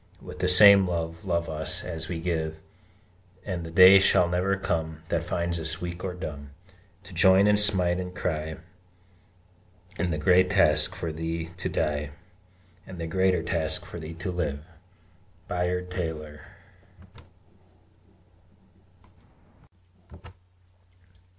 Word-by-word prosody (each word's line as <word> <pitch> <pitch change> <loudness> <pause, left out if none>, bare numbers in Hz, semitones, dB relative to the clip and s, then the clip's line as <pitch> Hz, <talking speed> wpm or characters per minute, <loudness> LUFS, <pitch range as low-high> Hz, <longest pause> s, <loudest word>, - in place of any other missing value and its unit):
With - - -11
the 90 - 0
same 100 +1 +7
love 85 0 -4
love 85 -2 -1
us, 80 0 -3
as 80 -3 -5
we 85 -2 -4
give; 80 -2 -3 0.9
And 90 -4 -4
the 80 - -8
day 95 +3 +8
shall 90 -2 +3
never 90 +2 0
come, 80 -4 -4
That 85 - 0
finds 85 0 -3
us 80 +1 -2
weak 90 0 -6
or 90 -2 -4
dumb 70 -5 -8 0.5
To 90 - -14
join 95 +3 +4
and 105 0 +3
smite 90 -4 +3
and 90 0 -7
cry 80 -2 -3 1.4
In 90 +1 -1
the 80 - -2
great 90 +4 +3
task, 75 -6 +3
for 80 -2 -5
thee 80 +1 -5
to 90 - -4
die, 75 -1 -2 0.8
And 95 - -10
the 85 - -4
greater 90 0 0
task, 80 -2 -2
for 85 - -9
thee 80 +1 -8
to 90 +3 -5
live! 75 -5 -4 0.8
BAYARD 90 0 -3
TAYLOR. 80 -4 -6
85 Hz, 125 wpm, -26 LUFS, 80-90 Hz, 1.4 s, day